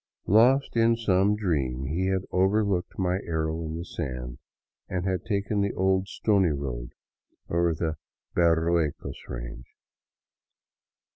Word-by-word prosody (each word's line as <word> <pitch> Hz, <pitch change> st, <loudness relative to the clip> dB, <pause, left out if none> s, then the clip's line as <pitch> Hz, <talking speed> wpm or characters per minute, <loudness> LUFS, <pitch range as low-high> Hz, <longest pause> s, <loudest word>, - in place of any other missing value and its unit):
Lost 125 Hz, +8 st, +4 dB
in 115 Hz, 0 st, +4 dB
some 100 Hz, -2 st, +2 dB
dream, 70 Hz, -11 st, -1 dB
he 85 Hz, +7 st, -1 dB
had 95 Hz, -1 st, 0 dB
overlooked 95 Hz, -1 st, +1 dB
my 90 Hz, 0 st, +1 dB
arrow 80 Hz, 0 st, -2 dB
in 80 Hz, 0 st, -4 dB
the 85 Hz, -, -5 dB
sand 60 Hz, -5 st, -5 dB, 0.5 s
and 90 Hz, -1 st, -2 dB, 0.2 s
taken 100 Hz, 0 st, 0 dB
the 100 Hz, 0 st, 0 dB
old 95 Hz, 0 st, +2 dB
stony 100 Hz, -3 st, +2 dB
road 65 Hz, -5 st, -4 dB, 0.6 s
over 85 Hz, 0 st, +2 dB
the 80 Hz, -1 st, -2 dB, 0.4 s
Berruecos 85 Hz, -2 st, +1 dB
range. -, -, -7 dB
90 Hz, 120 wpm, -27 LUFS, 80-100 Hz, 0.6 s, Lost